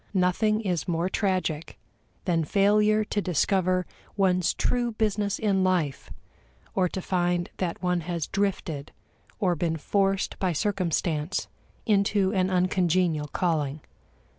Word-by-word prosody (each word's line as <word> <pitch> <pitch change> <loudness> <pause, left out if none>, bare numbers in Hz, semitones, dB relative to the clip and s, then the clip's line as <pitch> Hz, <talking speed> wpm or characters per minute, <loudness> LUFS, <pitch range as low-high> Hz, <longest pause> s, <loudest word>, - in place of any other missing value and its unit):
Nothing 215 +4 +2
is 180 -5 -2
more 170 +1 0
tragic 185 -6 -1 0.5
than 170 -3 +1
failure 210 +5 +3
to 210 0 -2
discover 185 +1 +1 0.3
one's 185 -3 +2
true 240 -2 0
business 210 -2 0
in 195 -3 +1
life, 175 -7 0 0.6
or 185 -2 +2
to 190 - -5
find 175 -1 0
that 180 -1 -3
one 180 -1 +1
has 170 -1 -3
drifted 175 -7 -2 0.4
or 185 -4 +1
been 165 0 -1
forced 195 +4 0
by 185 -2 +1
circumstance 170 -3 -1 0.4
into 200 -2 +2
an 185 -2 +2
uncongenial 180 -4 +1
calling. 150 -3 -1
185 Hz, 120 wpm, -26 LUFS, 170-200 Hz, 0.6 s, failure